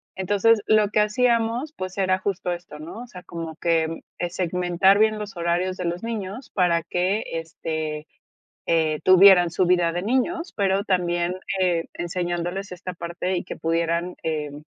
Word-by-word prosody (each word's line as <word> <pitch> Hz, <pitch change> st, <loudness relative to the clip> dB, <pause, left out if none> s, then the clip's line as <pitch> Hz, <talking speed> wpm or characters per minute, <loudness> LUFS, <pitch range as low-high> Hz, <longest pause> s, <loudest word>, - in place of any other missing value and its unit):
Entonces, 205 Hz, +4 st, +3 dB
lo 215 Hz, -1 st, +4 dB
que 210 Hz, -, +1 dB
hacíamos, 235 Hz, +4 st, +1 dB
pues, 185 Hz, 0 st, -5 dB
era 185 Hz, -1 st, +2 dB
justo 190 Hz, -2 st, -2 dB
esto, 175 Hz, -3 st, -7 dB
¿no?, 170 Hz, +10 st, -8 dB
o -, -, -11 dB
sea, 180 Hz, -6 st, -11 dB
como 165 Hz, -2 st, -7 dB
que, 165 Hz, -1 st, 0 dB, 0.2 s
eh, 175 Hz, -, -2 dB
segmentar 180 Hz, +2 st, +2 dB
bien 215 Hz, 0 st, +3 dB
los 210 Hz, -3 st, -7 dB
horarios 175 Hz, +2 st, 0 dB
de 180 Hz, -, -4 dB
los 175 Hz, +3 st, -3 dB
niños 225 Hz, +1 st, -5 dB
para 175 Hz, -3 st, +2 dB
que, 180 Hz, +6 st, 0 dB
este, 160 Hz, -2 st, -4 dB, 0.6 s
eh, 160 Hz, -2 st, +2 dB
tuvieran 185 Hz, -1 st, +7 dB
su 185 Hz, -, +1 dB
vida 175 Hz, -1 st, +3 dB
de 175 Hz, +1 st, -3 dB
niños, 330 Hz, -, -1 dB
pero 195 Hz, -1 st, +1 dB
también, 175 Hz, -2 st, 0 dB, 0.2 s
eh, 175 Hz, -3 st, +1 dB
enseñándoles 175 Hz, +2 st, -3 dB
esta 180 Hz, 0 st, -6 dB
parte, 175 Hz, +2 st, -3 dB
y 175 Hz, -, -2 dB
que -, -, -7 dB
pudieran, 170 Hz, +2 st, -1 dB
em, 150 Hz, -2 st, -3 dB
180 Hz, 160 wpm, -24 LUFS, 170-200 Hz, 0.6 s, tuvieran